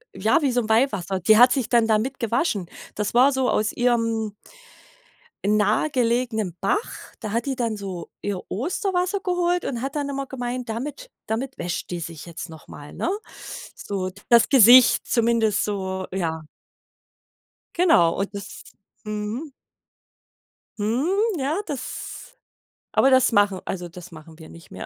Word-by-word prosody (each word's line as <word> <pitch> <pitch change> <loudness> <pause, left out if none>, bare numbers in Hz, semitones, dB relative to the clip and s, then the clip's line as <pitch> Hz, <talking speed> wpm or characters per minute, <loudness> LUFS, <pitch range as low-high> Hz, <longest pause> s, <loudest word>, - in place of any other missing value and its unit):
Ja, - - +2
wie 275 - +2
so 245 0 +1
'n 220 - -6
Weihwasser. 205 -5 +1
Die 215 +4 +5
hat 250 +1 +8
sich 260 -4 0
dann 235 -2 +3
damit 225 +5 0
gewaschen. 230 - 0 0.3
Das 210 -1 -2
war 260 +3 +6
so 265 -2 0
aus 215 0 +1
ihrem 230 -3 0 1.1
nahegelegenen 220 - +1
Bach. 420 +4 -2
Da 215 -3 -5
hat 235 +1 0
die 270 -2 -2
dann 230 -3 -1
so 195 -4 -7
ihr 200 -2 -3
Osterwasser 360 - -1
geholt 355 -1 0
und 240 -3 -3
hat 275 +3 -4
dann 290 -1 -1
immer 275 -1 -3
gemeint, 250 -2 -5
damit 290 - -5
damit 250 +4 -3
wäscht 175 -1 -4
die 175 - -3
sich 165 -1 -7
jetzt 170 0 -8
noch 160 -1 -13
mal, 145 0 -11
ne? - - -2 0.7
So, 190 -2 -4 0.2
das 235 -1 +6
Gesicht 250 -1 +7
zumindest 230 -3 +2
so, 190 -2 -3
ja. 160 -4 -2 1.3
Genau 325 - +5
und 195 - -1
das 200 0 -8 0.4
mhm. 215 +7 -4 1.3
Mhm. 240 - 0 0.3
Ja, 295 +6 -1
das 295 - -7 0.6
aber 270 - +5
das 260 -2 +4
machen 205 -3 +2
also, 175 -2 -4
das 180 +1 -12
machen 160 0 -13
wir 160 - -12
nicht 165 0 -15
mehr. 95 - -7
230 Hz, 150 wpm, -23 LUFS, 195-265 Hz, 1.3 s, hat